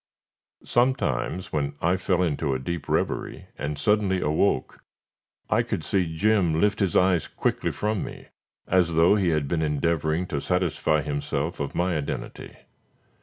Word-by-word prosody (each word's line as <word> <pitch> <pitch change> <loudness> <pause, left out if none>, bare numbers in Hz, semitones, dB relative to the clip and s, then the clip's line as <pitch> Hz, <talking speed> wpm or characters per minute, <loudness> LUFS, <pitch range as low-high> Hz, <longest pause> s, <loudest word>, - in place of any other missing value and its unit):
Sometimes 95 - 0
when 70 -1 -1
I 85 +2 +2
fell 90 -1 +1
into 75 -4 0
a - - -2
deep 75 +3 -5
reverie, - - -2
and 70 +1 -4
suddenly 100 +3 +2
awoke, 75 -2 0 0.6
I - - +3
could 80 - -3
see 85 -4 0
Jim 95 -5 +2
lift 100 +2 +2
his 95 -5 0
eyes 90 -3 +3
quickly - - -1
from 105 -1 -2
me, - - -9 0.4
as 90 -3 +2
though 80 +4 +5
he 100 -4 +2
had 75 -3 0
been 80 +2 0
endeavoring 80 +2 0
to 70 - -2
satisfy 85 -4 +1
himself 75 +2 -3
of 70 -2 -4
my 90 0 +1
identity. 75 -2 -5
85 Hz, 150 wpm, -25 LUFS, 75-95 Hz, 0.6 s, though